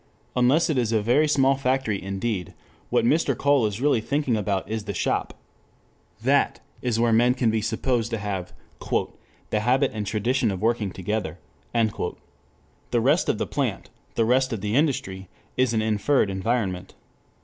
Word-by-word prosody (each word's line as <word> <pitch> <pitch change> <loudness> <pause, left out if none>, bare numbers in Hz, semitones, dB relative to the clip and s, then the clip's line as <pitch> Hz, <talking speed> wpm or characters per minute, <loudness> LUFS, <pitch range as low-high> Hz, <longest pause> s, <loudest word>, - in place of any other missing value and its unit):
Unless 130 +7 +3
it 140 - +1
is 115 -2 0
a 110 - +3
very 125 +9 +3
small 135 -2 +4
factory 130 -6 0
indeed, 95 -1 -3 0.3
what - - +2
Mr. 140 -1 +2
Cole 140 -5 +3
is 105 +1 -5
really 140 -5 +3
thinking 140 0 0
about 100 -2 -1
is 110 -1 -4
the 100 - -4
shop. - - -1 0.9
That - - +2 0.2
is 120 -3 0
where 115 -1 +3
men 120 +3 +4
can 120 -3 +2
be 110 0 0
supposed 115 +1 -1
to 115 - -2
have 100 -3 -4 0.4
"the 105 - -3
habit 130 +5 +2
and 105 -2 -4
tradition 115 +3 +1
of 95 -2 -3
working 110 -1 0
together." 95 -2 -3 0.3
The 115 -3 -1 0.8
rest - - +2
of - - +1
the - - -1
plant, - - -3 0.2
the 115 - +2
rest 130 +3 +2
of 110 -4 -3
the 105 0 -2
industry, 95 - 0 0.3
is 130 -2 +2
an 110 -2 +1
inferred 110 +1 +2
environment. 95 -2 -2
115 Hz, 165 wpm, -24 LUFS, 105-130 Hz, 0.9 s, small